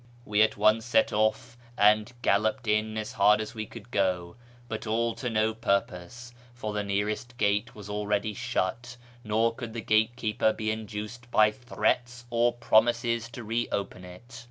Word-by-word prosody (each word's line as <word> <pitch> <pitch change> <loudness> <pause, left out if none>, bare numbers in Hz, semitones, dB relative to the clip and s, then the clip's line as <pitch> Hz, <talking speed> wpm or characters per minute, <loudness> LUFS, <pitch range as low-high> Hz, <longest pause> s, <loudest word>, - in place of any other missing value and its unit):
We 105 0 +2
at 110 - +3
once 110 +2 +4
set 115 -1 +2
off 110 +3 0 0.2
and 105 +2 +4
galloped 110 +4 +1
in 110 +1 +1
as 110 0 -4
hard 105 +1 +4
as 110 - -5
we 110 -1 -5
could 115 +1 -12
go, 90 -4 0 0.3
but 110 -1 -5
all 115 +1 +1
to 125 +2 -4
no 110 0 +1
purpose, 110 +2 -2 0.2
for 110 -3 -4
the 105 0 -1
nearest 105 +4 -2
gate 105 +2 0
was 105 -2 -10
already 105 +1 -1
shut, 120 +1 -3 0.3
nor 115 +2 +1
could 115 -1 -7
the 115 - -4
gatekeeper 110 0 +1
be 110 0 -2
induced 110 +2 -6
by 110 -3 +5
threats 120 +1 -1
or 120 +1 +3
promises 115 0 +2
to 120 0 -8
re 115 +2 -1
opeu 95 -2 -3
it. 90 +7 -12
110 Hz, 165 wpm, -28 LUFS, 105-120 Hz, 0.3 s, by